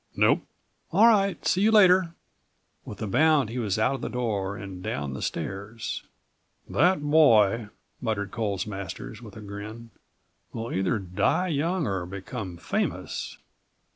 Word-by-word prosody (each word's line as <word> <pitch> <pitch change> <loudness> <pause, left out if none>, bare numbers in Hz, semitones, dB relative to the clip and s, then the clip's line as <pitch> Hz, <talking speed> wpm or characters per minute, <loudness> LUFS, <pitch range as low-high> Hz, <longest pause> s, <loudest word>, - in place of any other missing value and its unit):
"Nope." - - +4 0.5
"All 200 +7 +6
right. 200 -4 +3
See 185 - +2
you 215 - +5
later." 185 -5 +5 0.7
With 105 +2 -7
a - - -1
bound39 150 +2 +3
he 120 +2 -4
was 105 -4 -1
out 110 +5 +2
of 135 - -5
the - - -3
door 100 -5 -2
and 95 -2 -8
down 70 -5 -3
the - - -6
stairs. 105 +4 -4 0.7
"That 180 -3 +2
boy," 115 -8 +4 0.3
muttered 110 -4 -2
Coles 100 -4 -2
Masters, 100 -4 -7
with - - -11
a - - -8
grin, 105 +3 -8 0.6
"will 115 +1 -4
either 95 +4 +1
die 95 - 0
young 165 +3 0
or 95 -5 -2
become 95 0 -6
famous. 85 - -3
110 Hz, 145 wpm, -26 LUFS, 100-155 Hz, 0.7 s, All